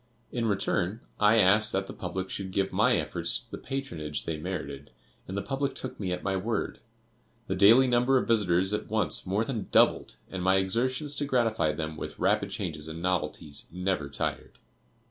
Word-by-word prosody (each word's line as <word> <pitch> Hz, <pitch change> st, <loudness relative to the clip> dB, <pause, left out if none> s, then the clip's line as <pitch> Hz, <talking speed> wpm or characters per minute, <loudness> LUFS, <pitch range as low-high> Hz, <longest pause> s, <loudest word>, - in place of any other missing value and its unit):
In 115 Hz, -2 st, -1 dB
return, 100 Hz, 0 st, 0 dB, 0.2 s
I 105 Hz, +1 st, +5 dB
asked 105 Hz, +1 st, +5 dB
that 95 Hz, 0 st, 0 dB
the -, -, -8 dB
public 95 Hz, +1 st, -5 dB
should 95 Hz, -1 st, -4 dB
give 95 Hz, +1 st, -1 dB
my -, -, +4 dB
efforts -, -, -1 dB
the -, -, -6 dB
patronage 85 Hz, -, -4 dB
they 80 Hz, -, -2 dB
merited, 75 Hz, -4 st, -5 dB, 0.4 s
and 95 Hz, -, -5 dB
the 100 Hz, -, -2 dB
public 135 Hz, 0 st, -2 dB
took 130 Hz, -, -6 dB
me 95 Hz, -3 st, -2 dB
at 90 Hz, -, -3 dB
my 95 Hz, 0 st, 0 dB
word. 110 Hz, +3 st, -2 dB, 0.7 s
The -, -, -2 dB
daily 110 Hz, +7 st, +7 dB
number 125 Hz, +1 st, +3 dB
of -, -, 0 dB
visitors 95 Hz, -4 st, +3 dB
at 105 Hz, 0 st, -3 dB
once 110 Hz, -3 st, 0 dB
more 100 Hz, +4 st, +1 dB
than 115 Hz, -5 st, -3 dB
doubled, -, -, +3 dB, 0.2 s
and 95 Hz, -, -4 dB
my 95 Hz, +1 st, +4 dB
exertions 130 Hz, +9 st, +1 dB
to 145 Hz, -, 0 dB
gratify 115 Hz, -, +1 dB
them 80 Hz, 0 st, -4 dB
with -, -, -6 dB
rapid -, -, +1 dB
changes 75 Hz, +1 st, -5 dB
and 80 Hz, +1 st, -6 dB
novelties 80 Hz, -4 st, -2 dB
never 90 Hz, -5 st, -2 dB
tired. -, -, -4 dB
95 Hz, 185 wpm, -28 LUFS, 90-115 Hz, 0.7 s, daily